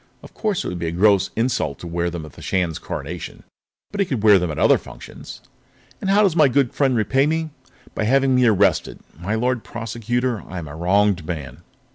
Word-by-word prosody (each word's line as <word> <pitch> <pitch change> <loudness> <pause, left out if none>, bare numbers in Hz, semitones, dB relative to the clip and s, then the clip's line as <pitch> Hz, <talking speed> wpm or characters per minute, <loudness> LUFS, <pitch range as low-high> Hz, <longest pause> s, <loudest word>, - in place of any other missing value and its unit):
Of - - -13
course 210 -5 -1
it - - -4
would 90 - -4
be 85 - -2
a - - -2
gross 100 +2 +3
insult 115 - -1
to - - -10
wear 85 +1 -1
them 85 -2 -6
at 75 - -12
the - - -13
Shan's 90 -4 -1
Coronation, 80 +6 -7 0.5
but 205 - -6
he 200 - +3
could 125 -9 -2
wear 105 -3 +7
them 90 -1 -2
at 75 - -5
other - - +4
functions. - - -11 0.6
"And 190 - -2
how 205 +2 +5
does 190 -5 +2
my 155 -4 +6
good 135 -1 +1
friend 135 -3 +2
repay 120 +6 +2
me? 160 0 -1 0.4
By 110 - -2
having 135 +3 +3
me 125 -1 +4
arrested. 100 -2 +2 0.2
My 100 +6 -2
Lord 125 +1 0
Prosecutor, 120 +1 -3
I 90 - -7
am 85 -3 -6
a 70 - -9
wronged 95 +2 +2
man." 75 -4 -6
105 Hz, 215 wpm, -21 LUFS, 85-130 Hz, 0.6 s, wear